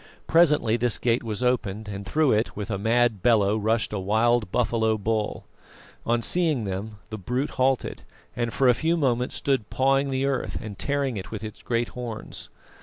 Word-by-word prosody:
Presently 150 -9 +4
this 120 -1 +1
gate 120 0 +1
was 110 +1 -3
opened, 110 -4 0
and 100 -1 -5
through 150 +7 +2
it, 110 +2 +1
with 105 +1 -4
a 100 - -2
mad 115 -1 +2
bellow, 105 -4 +3
rushed 110 +1 0
a 105 - -1
wild 110 +2 +2
buffalo 110 -2 +1
bull. 110 0 -2 0.6
On 120 0 +1
seeing 160 -7 +1
them 100 +2 -5
the 110 - -5
brute 125 +9 -2
halted, 130 0 0 0.3
and 120 -1 -1
for 135 - +2
a 125 - +7
few 165 +7 0
moments 125 -5 0
stood 135 -7 0
pawing 135 +1 +2
the 135 0 0
earth 135 -2 -1
and 105 -3 -8
tearing 140 -4 -1
it 95 - -6
with 110 -1 -6
its 110 -1 -8
great 120 0 -1
horns. 120 -3 -7
115 Hz, 185 wpm, -25 LUFS, 110-130 Hz, 0.6 s, a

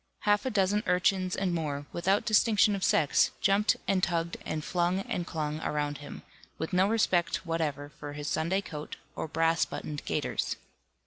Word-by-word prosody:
half 205 +3 +2
a - - +2
dozen 205 -1 +2
urchins 185 0 +2
and 190 -2 0
more, 145 -4 -2
without 190 +4 +1
distinction 215 -1 +4
of 195 - -4
sex, 150 -3 +4
jumped 200 +2 +3
and 190 -1 +2
tugged 170 -1 0
and 155 -1 -3
flung 180 +1 +1
and 175 -3 -3
clung 155 -1 -3
around 145 -2 -2
him, 145 - -9 0.3
with 160 +4 -4
no 185 +2 +4
respect 190 -6 +1
whatever 150 -4 -2
for 145 0 -6
his 145 0 -5
Sunday 170 +7 0
coat, 150 -5 -7 0.2
or - - -3
brass 165 +1 +2
buttoned 150 -1 -5
gaiters. - - -1
175 Hz, 170 wpm, -29 LUFS, 155-195 Hz, 0.3 s, distinction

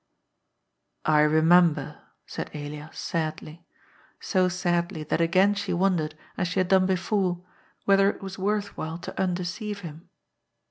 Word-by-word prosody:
" - - -50
I 155 -1 +4
remember," 160 +2 +3 0.2
said - - -6
Elias 150 +1 -7
sadly, 160 0 -4 0.5
so 185 -2 +1
sadly 175 -2 -1
that 155 - -1
again 185 +4 +4
she 200 -2 -3
wondered, 175 -4 0 0.2
as 180 - 0
she 180 +2 -1
had 185 -1 +1
done 190 -1 +4
before, 185 -1 0 0.4
whether 195 0 +5
it 200 - -6
was 195 0 -7
worth 205 +1 -1
while 160 +1 -4
to 175 - -5
undeceive 185 +3 -3
him. 165 -1 -10
180 Hz, 140 wpm, -26 LUFS, 160-195 Hz, 0.5 s, whether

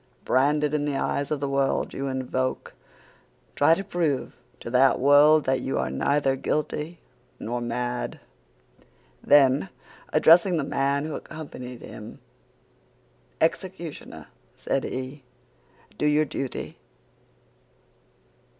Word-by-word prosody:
Branded 150 +3 +2
in 150 -1 0
the 145 -1 -1
eyes 140 +1 -1
of 150 -2 -2
the 140 - -1
world 135 0 0
you 140 - -3
invoke, 130 -1 -3 0.8
try 160 +3 +5
to 195 - -4
prove 160 -8 -2 0.2
to 115 - -7
that 130 0 +4
world 145 +3 +6
that 130 0 0
you 135 - -2
are 65 0 -1
neither 135 - +1
guilty 150 +4 -3 0.4
nor 120 +2 -3
mad!' 120 +1 -3 1.0
"Then, 140 +4 +4 0.4
addressing 170 +3 +5
the 155 - 0
man 140 +1 0
who 155 - -4
accompanied 125 -7 -8
him, - - -10 1.2
'Executioner,' 170 -1 -3 0.3
said 135 - -2
he, 130 +2 -6 0.8
'do 150 - +2
your 150 +1 +3
duty. 135 -2 -5
140 Hz, 115 wpm, -25 LUFS, 130-150 Hz, 1.2 s, world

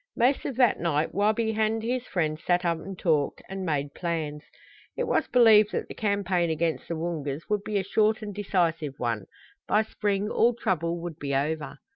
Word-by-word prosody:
Most 255 +3 +2
of 265 - -3
that 250 -2 +3
night 160 -2 0
Wabi 215 +4 +2
and 220 +1 0
his 250 +2 -2
friend 155 -4 -1
sat 175 +1 +1
up 170 -1 +1
and 195 +1 -8
talked, 155 -6 0
and 190 0 -5
made 145 -4 -1
plans. 160 -4 -3 0.6
It - - 0
was 475 - +1
believed 220 -4 +6
that - - -2
the - - -7
campaign 195 -5 0
against 160 0 -1
the 170 - -3
Woongas 160 -3 -4
would 210 -1 0
be 210 -1 -1
a 195 - 0
short 215 +3 +1
and 205 -1 -5
decisive 170 -7 0
one. 115 -5 -2 0.4
By 215 - +3
spring 205 -2 -1
all 235 +1 +3
trouble 170 -7 -1
would 170 -3 -6
be 140 -1 -2
over. 150 +1 -2
180 Hz, 190 wpm, -27 LUFS, 160-215 Hz, 0.6 s, believed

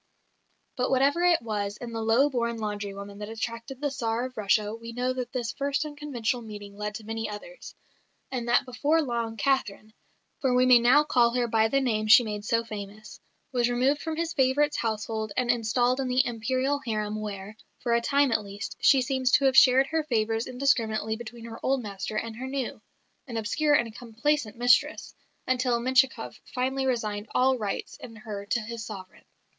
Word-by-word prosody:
But 250 0 0
whatever 275 +5 +3
it 350 -7 +4
was 205 -2 -3
in 235 -1 -7
the 225 - -3
low 225 +6 +4
born 235 -4 -1
laundry 205 -2 -4
woman 200 +1 -9
that 210 0 -6
attracted 230 +3 -5
the 290 -1 -1
Tsar 230 -2 -1
of 255 0 -8
Russia, 210 0 +1
we 230 +1 -8
know 250 +2 -1
that 250 -1 -5
this 240 -3 -2
first 280 +1 -1
unconventional 275 -6 -3
meeting 205 -2 -9
led 210 0 -4
to 225 - -7
many 225 0 -4
others, 355 - -9 0.6
and 245 -3 -3
that 240 +3 +3
before 290 +6 +1
long 235 -3 -3
Catherine 215 -4 -1 0.5
(for 260 -2 +1
we 250 0 +4
may 250 -1 +7
now 250 +5 +5
call 240 -5 +3
her 245 -1 +1
by 220 -1 +3
the 275 +5 +2
name 220 -5 0
she 235 +3 +8
made 210 -2 -4
so 230 +2 +1
famous) 215 -1 -9 0.3
was 245 -2 +1
removed 260 +4 +1
from 320 -1 -3
his 335 +1 -2
favourite's 285 +2 +2
household 220 -1 -2
and 245 -1 +3
installed 245 +2 +1
in 265 - -1
the 255 +1 +3
Imperial 255 +4 -1
harem 215 -2 -2
where, 205 0 -6 0.3
for 235 - +1
a 235 - +3
time 280 +2 +2
at 220 -2 +1
least, 200 +1 -7
she 265 -2 +5
seems 260 -1 0
to 275 - +5
have 265 -1 +3
shared 260 0 +7
her 320 +2 -1
favours 225 -3 0
indiscriminately 230 -4 0
between 235 0 -9
her 225 -1 -8
old 265 -1 +1
master 200 0 -5
and 225 0 -3
her 260 +2 -5
new 265 -2 -4 0.5
"an 235 -3 -5
obscure 295 +7 +2
and 230 -6 0
complaisant 240 0 -1
mistress" 245 +1 +2 0.3
until 250 -2 +1
Menshikoff 260 +2 +1
finally 265 +1 0
resigned 215 -4 -2
all 260 +1 +4
rights 205 -2 -4
in 225 - -11
her 210 -2 -7
to 235 - 0
his 230 +1 -6
sovereign. 195 -5 -10
235 Hz, 190 wpm, -27 LUFS, 220-260 Hz, 0.6 s, she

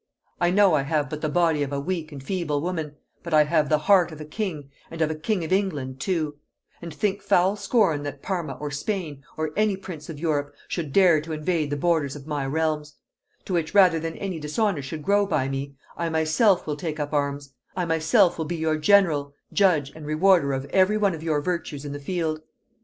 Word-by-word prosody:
I 175 - +3
know 195 -1 +4
I 150 - +3
have 145 0 -1
but 150 - -5
the 155 - -1
body 165 -2 +2
of 140 -1 -2
a 140 - -1
weak 160 +1 -3
and 140 -2 -9
feeble 150 -2 -1
woman, 160 -2 -3 0.3
but 170 -2 -1
I 150 - +7
have 150 -1 +1
the 155 - +4
heart 180 +2 +4
of 155 - -10
a 155 - -7
king, 155 -5 -5 0.2
and 165 - -8
of 160 -1 +1
a - - -1
king 175 +4 -2
of 160 - -1
England 145 -10 -1
too; 155 -4 -2 0.4
and 170 -1 -7
think 205 +2 -1
foul 195 0 +3
scorn 200 - +1
that 145 -1 -7
Parma 170 -7 -2
or 145 +3 -6
Spain, 150 -2 -4
or 155 -1 -2
any 210 -2 +2
prince 175 -6 -9
of 160 - -6
Europe, 145 -3 -1
should 160 -5 -4
dare 175 -3 +5
to 160 +1 -6
invade 155 0 -1
the 145 - -2
borders 155 -3 +1
of 140 -2 -10
my 145 -3 -2
realms: 150 0 -1 0.5
To 190 - -4
which, 170 +2 -1
rather 180 -5 +6
than 165 +1 -5
any 185 -4 -4
dishonor 160 +3 0
should 150 +2 -6
grow 200 +2 +3
by 135 -8 0
me, 135 +1 -4 0.2
I 170 -1 -2
myself 160 +5 +2
will 150 - -2
take 155 -1 -4
up 145 0 -3
arms; 140 -1 -2 0.2
I 180 - 0
myself 165 +4 +3
will 160 - -1
be 170 - -3
your 160 -1 0
general, 155 -5 +3 0.2
judge, 165 -8 +3
and 150 0 -10
rewarder 155 -1 +3
of 135 0 -3
every 190 +3 +4
one 200 -3 +2
of 160 - -7
your 155 -3 0
virtues 155 -4 -3
in 145 - -5
the 145 - -5
field. 155 0 -2
160 Hz, 220 wpm, -25 LUFS, 145-180 Hz, 0.5 s, I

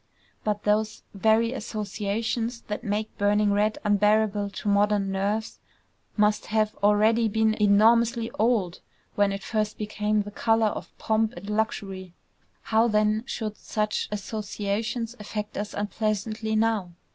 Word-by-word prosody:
_" - - -38
But 210 -1 -1
those 215 +1 0
very 220 +4 +2
associations 220 +1 -3
that 210 +3 -5
make 215 0 -2
burning 205 0 +3
red 210 +1 +1
unbearable 210 0 +2
to 200 - -7
modern 205 -1 +2
nerves 205 +3 -2 0.6
must 210 0 +2
have 215 0 +1
already 215 +3 +4
been 220 +1 +2
enormously 225 +3 +4
old 215 -6 +1 0.3
when 205 -1 +2
it 195 0 -5
first 215 -2 -1
became 210 0 0
the 205 - -8
color 225 +1 +2
of - - -8
pomp 220 0 +1
and 175 +3 -10
luxury. 195 -4 -3 0.5
How 225 +1 +3
then 215 +1 +1
should 215 -4 -4
such 215 -1 -2
associations 215 +3 -3
affect 210 0 -5
us 205 0 -3
unpleasantly 215 +1 -2
now? 215 -5 +1
210 Hz, 135 wpm, -26 LUFS, 205-220 Hz, 0.6 s, already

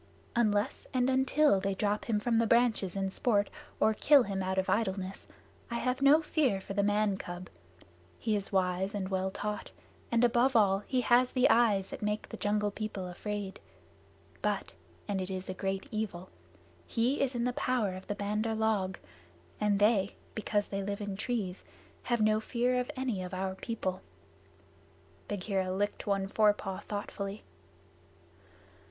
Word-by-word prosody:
"Unless 210 -3 +1
and 255 +1 +3
until 265 -3 +4
they 195 0 -1
drop 205 +1 0
him 220 -3 +1
from 230 +1 +1
the 230 - +2
branches 230 -6 +3
in 195 -1 -1
sport, 205 -1 +1 0.3
or 220 - +4
kill 280 +5 +6
him 195 -2 -3
out 190 0 -1
of 190 - +1
idleness, 195 -3 -1 0.4
I 235 - -3
have 255 +2 -1
no 290 +3 +6
fear 275 -10 +1
for 195 - -7
the 200 - +2
man 205 -1 +2
cub. 175 0 -7 0.7
He 220 -2 0
is 200 -1 -3
wise 190 +1 +1
and 190 -2 -2
well 190 0 0
taught, 210 +2 -4 0.4
and 235 0 +3
above 245 +2 +3
all 195 -3 +5
he 255 -1 +1
has 245 +1 +4
the 255 0 +5
eyes 210 -5 +3
that - - -7
make 210 0 -1
the 225 - -8
Jungle 210 0 0
People 205 -3 -4
afraid. 200 +2 -5 0.8
But - - -1 0.4
(and 200 -2 -1
it 185 - -2
is 185 0 -4
a - - -4
great 195 +2 -3
evil) 200 -5 -4 0.6
he 245 +5 +1
is 270 -2 0
in 240 - 0
the 250 0 0
power 240 -7 0
of 185 +1 -9
the 205 - -2
Bandar 210 +2 -1
log, 210 -4 0 0.6
and 210 -1 +2
they, 205 -1 +3 0.2
because 210 -1 -1
they 195 0 -2
live 200 +1 -3
in 205 -1 -3
trees, 205 -4 -3 0.4
have 240 -2 0
no 215 0 +4
fear 245 +3 0
of 250 - -2
any 255 -7 -2
of 180 0 -5
our 190 0 -2
people." 190 -2 -3 1.3
Bagheera 195 -2 -1
licked 205 +3 -2
one 195 -1 +1
forepaw 205 -2 +2
thoughtfully. 205 0 -5
205 Hz, 165 wpm, -31 LUFS, 195-235 Hz, 1.3 s, kill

